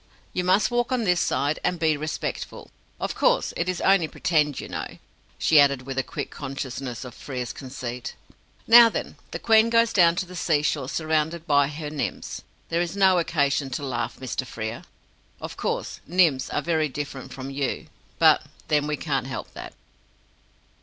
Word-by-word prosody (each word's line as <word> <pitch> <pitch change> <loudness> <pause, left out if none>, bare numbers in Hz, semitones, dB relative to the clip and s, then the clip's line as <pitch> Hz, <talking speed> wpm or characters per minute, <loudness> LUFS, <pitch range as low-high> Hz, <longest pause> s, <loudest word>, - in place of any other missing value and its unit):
"You 180 - -1
must 185 +6 +3
walk 240 +1 0
on 250 -2 +1
this 180 -4 +2
side, 145 +2 0
and 180 - 0
be 160 -2 +2
respectful. 155 +1 -5 0.3
Of - - -2
course - - +2
it 170 +2 -1
is 185 - -2
only 190 -4 +4
Pretend, 150 -4 0
you - - -6
know," - - -6 0.4
she 155 - +5
added, 140 -2 +4
with 135 +1 -5
a - - +3
quick - - -6
consciousness 130 -2 -5
of 125 - -9
Frere's 125 -3 -5
conceit. 125 -2 -6 0.5
"Now 235 0 +9
then, - - -5
the - - -4
Queen 225 0 +4
goes 230 0 +3
down 170 -4 +5
to 190 - -1
the 180 +1 -11
Seashore 150 -5 0
surrounded 160 +1 -1
by 145 -3 +4
her 150 +1 -6
Nymphs! 150 -2 -4 0.3
There 170 +1 +1
is 175 +3 -3
no 190 -2 +5
occasion 145 -4 +1
to 135 +2 -4
laugh, 120 -3 -3
Mr. 130 0 -3
Frere. 110 -2 -6 0.5
Of - - -7
course, - - -3
Nymphs 165 -6 +3
are 150 - -2
very 160 -2 +1
different 140 -1 -6
from 135 0 -7
you, 135 -1 -2 0.3
but - - +6 0.3
then 150 -1 +2
we 150 -1 -1
can't 135 -5 -2
help 135 - -6
that." - - -9
150 Hz, 175 wpm, -25 LUFS, 135-175 Hz, 0.5 s, Now